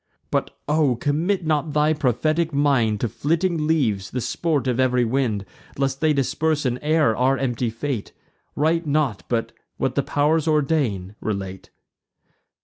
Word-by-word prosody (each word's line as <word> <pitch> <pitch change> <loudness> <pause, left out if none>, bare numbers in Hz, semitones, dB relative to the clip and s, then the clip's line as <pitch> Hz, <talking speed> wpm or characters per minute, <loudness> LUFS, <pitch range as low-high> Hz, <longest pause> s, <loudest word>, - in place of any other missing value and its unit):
But - - -1
O! 150 -4 +2
commit 160 - 0
not 150 -1 0
thy 150 +1 +3
prophetic 155 +4 0
mind 135 -7 +2
To 120 - +1
flitting 165 - 0
leaves, 110 - +1
the 125 - -3
sport 150 +3 -1
of 125 -1 0
ev'ry 125 -1 +3
wind, 115 -5 0 0.3
Lest 135 0 -1
they 155 -1 +4
disperse 150 +2 0
in 125 0 0
air 150 -6 +2
our 130 +3 +2
empty 125 -3 -1
fate; 115 0 -4 0.4
Write 160 +2 +1
not, 140 -8 +1
but, 115 -2 -1 0.3
what - - 0
the - - +1
pow'rs 150 +2 +1
ordain, 135 - +1
relate." 95 -3 -4
140 Hz, 145 wpm, -23 LUFS, 120-155 Hz, 0.4 s, they